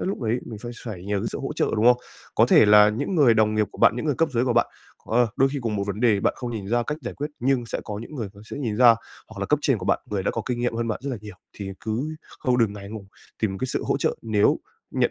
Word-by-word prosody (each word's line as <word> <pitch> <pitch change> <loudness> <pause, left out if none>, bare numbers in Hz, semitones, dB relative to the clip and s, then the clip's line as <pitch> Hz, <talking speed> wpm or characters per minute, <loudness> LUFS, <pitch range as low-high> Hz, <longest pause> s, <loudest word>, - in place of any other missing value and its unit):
lúc 195 - -2
đấy 115 +1 0
mình 110 -3 -7
sẽ 120 - -7 0.2
phải 95 -6 -6
nhờ 100 0 -1
cái - - -3
sự - - -5
hỗ - - -3
trợ, - - 0
đúng 110 - +1
không? 125 0 +7 0.4
Có - - +5
thể - - +6
là 105 0 +8
những 110 - -2
người 135 -9 +5
đồng 110 0 +3
nghiệp 110 -1 +2
của - - -13
bạn, 115 - +5
những 125 - -3
người 145 - +2
cấp 165 +5 +1
dưới 120 0 +2
của 125 - +1
bạn, - - +3 0.5
à, 120 - +4 0.2
đôi 135 +1 +4
khi 145 - -2
cùng 110 -2 -1
một 100 - -1
vấn 100 +1 -4
đề, 110 -5 +3
bạn - - +1
không 125 -2 -5
nhìn 105 -4 -5
ra 120 +2 +2
cách 150 +1 -3
giải 125 - -6
quyết 145 +2 -4
nhưng 125 -1 +1
sẽ - - -3
có 105 -1 -5
những 135 - -10
người 115 -7 -4
họ 100 - -14
sẽ - - -5
nhìn 115 -7 -2
ra, 120 -1 +7 0.3
hoặc 110 -3 -9
là 100 - -1
cấp 150 - +2
trên 135 -5 +2
của 90 - -6
bạn, - - +3
người 100 -2 -1
đã - - 0
có 115 - -3
kinh 120 -2 -2
nghiệm 120 -1 0
hơn 115 0 -1
bạn 110 - -2
rất 140 - -3
là 125 - -3
nhiều. 105 -2 -10 0.2
Thì 100 -1 -6
cứ 125 +8 -3 0.2
không 125 -1 +1
đừng 110 -3 +3
ngại 100 -1 -9
ngùng, 105 -2 -8 0.3
tìm 95 -3 -1
cái 130 - -1
sự - - -2
hỗ - - +1
trợ - - 0
nếu 105 -2 +2 0.3
nhận - - +1
115 Hz, 315 wpm, -24 LUFS, 105-125 Hz, 0.5 s, là